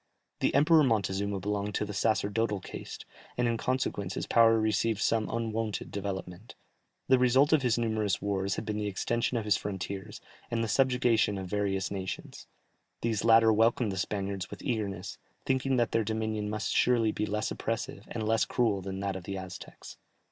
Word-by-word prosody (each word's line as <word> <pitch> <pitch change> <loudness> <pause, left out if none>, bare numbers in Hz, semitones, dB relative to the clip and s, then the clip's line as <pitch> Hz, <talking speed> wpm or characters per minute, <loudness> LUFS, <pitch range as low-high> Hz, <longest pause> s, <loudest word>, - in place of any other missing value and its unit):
The - - +1
Emperor 155 +2 +6
Montezuma 100 -4 0
belonged 105 +1 -2
to - - 0
the 105 - -6
sacerdotal 105 0 0
caste, - - -8 0.3
and 120 0 +2
in 115 - +1
consequence 110 -6 -2
his - - -3
power 115 -1 +5
received 110 0 +1
some 110 0 +1
unwonted 115 -2 -2
development. 95 0 -6 0.5
The 130 -1 +5
result 130 +4 +4
of 155 - +5
his 120 -3 +2
numerous 110 -4 0
wars 100 -1 -1
had - - -5
been 105 0 -2
the 105 - -2
extension 115 +5 -1
of 110 - -3
his 105 - +3
frontiers, 100 +1 -5 0.3
and 115 -1 0
the - - -1
subjugation 120 -3 +2
of 95 - -4
various 100 0 -1
nations; 95 -2 -6 0.5
these 115 -3 0
latter 115 -1 +6
welcomed 115 0 +2
the - - -4
Spaniards 100 0 -3
with - - -9
eagerness, 105 -4 -3 0.3
thinking 130 0 +1
that 120 -1 +1
their 115 - +2
dominion 110 -1 -2
must 105 0 -2
surely 115 -3 +3
be 105 0 -2
less 105 +1 -2
oppressive 115 -3 -4
and 110 -2 -3
less 110 0 +3
cruel 110 -6 +1
than 95 +1 -5
that 100 -1 -2
of 95 -1 -7
the 100 0 -4
Aztecs. 95 0 -9
110 Hz, 175 wpm, -29 LUFS, 100-115 Hz, 0.5 s, Emperor